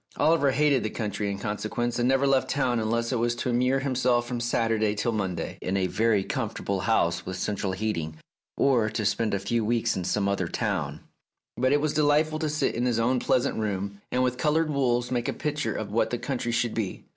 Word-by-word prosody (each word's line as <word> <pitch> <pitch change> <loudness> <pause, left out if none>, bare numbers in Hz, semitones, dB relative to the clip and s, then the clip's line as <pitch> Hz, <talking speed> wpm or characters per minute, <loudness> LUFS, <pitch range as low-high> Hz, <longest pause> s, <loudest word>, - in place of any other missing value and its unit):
Oliver 155 -3 +3
hated 140 -1 +3
the 110 - -2
country 105 -2 -3
in 100 - -3
consequence, 110 +4 -2
and 120 +1 +2
never 135 +1 +3
left 135 -1 +2
town 125 -4 +1
unless 115 +2 0
it 125 - 0
was 120 +1 +1
to 125 - -3
immure 125 +3 +2
himself 125 -3 +1
from 120 -1 -3
Saturday 115 -3 +1
till 120 +3 0
Monday 95 -6 -3
in 95 +2 -1
a 95 - +1
very 105 +1 +2
comfortable 100 0 -3
house 85 -4 +1
with 95 - -5
central 100 0 -2
heating, 90 -6 -3 0.4
or 120 -6 +3
to 110 0 -3
spend 110 0 +1
a - - -1
few 115 +4 -1
weeks 115 +1 +1
in 95 - -2
some 100 +3 0
other 100 -3 0
town; 85 -9 -2 0.5
but 130 +1 +1
it 145 0 +3
was 155 -1 0
delightful 155 +1 +2
to 155 -1 -1
sit 155 +1 0
in 120 +2 0
his 120 -2 +1
own 125 +2 +2
pleasant 125 - +1
room, 100 -1 -3
and 125 +1 +2
with 125 0 -1
coloured 155 +1 +2
wools 125 -3 +1
make 120 -1 -1
a - - -1
picture 150 -1 -2
of 110 -2 -4
what 115 +1 +1
the 120 - -1
country 120 -1 -3
should 120 0 0
be. 110 -5 -3
115 Hz, 215 wpm, -26 LUFS, 105-130 Hz, 0.5 s, Oliver